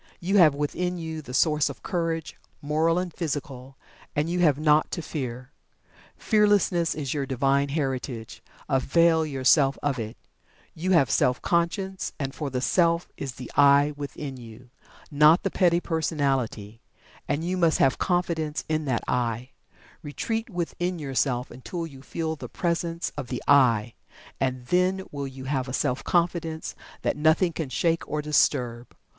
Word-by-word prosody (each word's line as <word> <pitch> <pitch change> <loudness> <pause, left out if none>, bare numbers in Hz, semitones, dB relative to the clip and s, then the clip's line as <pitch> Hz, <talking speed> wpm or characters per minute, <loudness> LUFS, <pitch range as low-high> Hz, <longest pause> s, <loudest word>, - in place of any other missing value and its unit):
You 195 +4 +1
have 155 -5 +6
within 180 +5 -2
you 160 -2 -5
the 125 - -10
Source 150 +2 +2
of 140 - -10
Courage, 165 -2 -2 0.2
Moral 155 +3 +1
and 180 -2 -2
Physical, 140 -5 -5 0.4
and 150 +2 +1
you 180 - 0
have 150 -6 +4
naught 150 0 +3
to 170 - -4
Fear 125 -4 -5 0.7
Fearlessness 205 -6 +2
is 145 -4 -3
your 140 -3 -2
Divine 140 +2 +1
Heritage, 130 -5 -3 0.3
avail 160 +4 +3
yourself 135 0 +3
of 140 -3 0
it. 110 0 -5 0.6
You 175 +4 -3
have 135 -10 +4
Self 125 +3 +2
Conscience, 190 +3 -1 0.2
for 150 0 -4
the 125 -1 -2
Self 170 +2 +2
is 135 -3 -5
the 125 0 -9
"I" 145 +1 +5
within 145 -1 -6
you, 120 +1 -13 0.4
not 150 +3 +5
the 195 - -1
petty 175 -2 +3
personality, 135 - -2 0.5
and 145 +2 -1
you 180 +2 -1
must 170 -4 +3
have 135 - +2
confidence 170 -4 -1
in 155 -1 -1
that 125 -4 -1
"I." 120 +1 -1 0.5
Retreat 225 +10 -3
within 175 -1 -3
yourself 135 -4 -1
until 165 +7 -5
you 135 -5 -11
feel 160 +3 -3
the - - -9
presence 170 -1 -2
of 145 -4 -5
the 125 - -5
"I," 120 -5 +4 0.5
and 130 -2 -1
then 185 +5 +1
will 140 -1 -4
you 130 0 -9
have 135 -1 -1
a 125 - -5
Self 135 -2 -1
Confidence 170 -2 -1 0.3
that - - +1
nothing 160 +3 +3
can 155 -5 -4
shake 165 +4 +1
or 150 0 -2
disturb. 125 -5 +1
150 Hz, 155 wpm, -26 LUFS, 130-170 Hz, 0.7 s, have